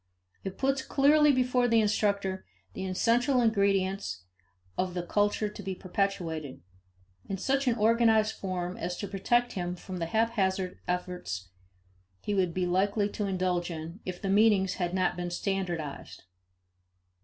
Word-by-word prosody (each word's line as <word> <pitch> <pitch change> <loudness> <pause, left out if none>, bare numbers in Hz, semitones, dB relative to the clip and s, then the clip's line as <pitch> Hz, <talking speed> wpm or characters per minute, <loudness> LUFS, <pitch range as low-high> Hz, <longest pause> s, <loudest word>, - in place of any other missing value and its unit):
It 195 -1 -5
puts 270 0 +1
clearly 295 +2 +4
before 250 -1 +2
the 230 -1 +4
instructor 200 -3 +1 0.3
the 190 - -4
essential 240 +7 +2
ingredients 195 - +1 0.5
of 185 -1 -2
the 175 - -2
culture 205 +3 +1
to 210 0 -8
be 190 -1 -4
perpetuated, 175 - -3 0.7
in 195 - -2
such 270 +7 0
an 240 - +3
organized 220 -1 +3
form 185 -2 -4
as 175 +1 -3
to 200 - -4
protect 240 +5 +1
him 180 -2 -3
from 185 +1 -7
the 165 -1 -2
haphazard 190 -3 0
efforts 180 - -3 0.7
he 205 - -3
would 185 -3 +2
be 180 +2 -1
likely 200 +3 +1
to 205 0 -3
indulge 185 -2 0
in 165 +3 -6
if 185 -1 -5
the - - -4
meanings 200 -2 +4
had 175 +1 -1
not 185 - +1
been 175 0 -3
standardized. 175 -5 -3
195 Hz, 145 wpm, -29 LUFS, 180-220 Hz, 0.7 s, clearly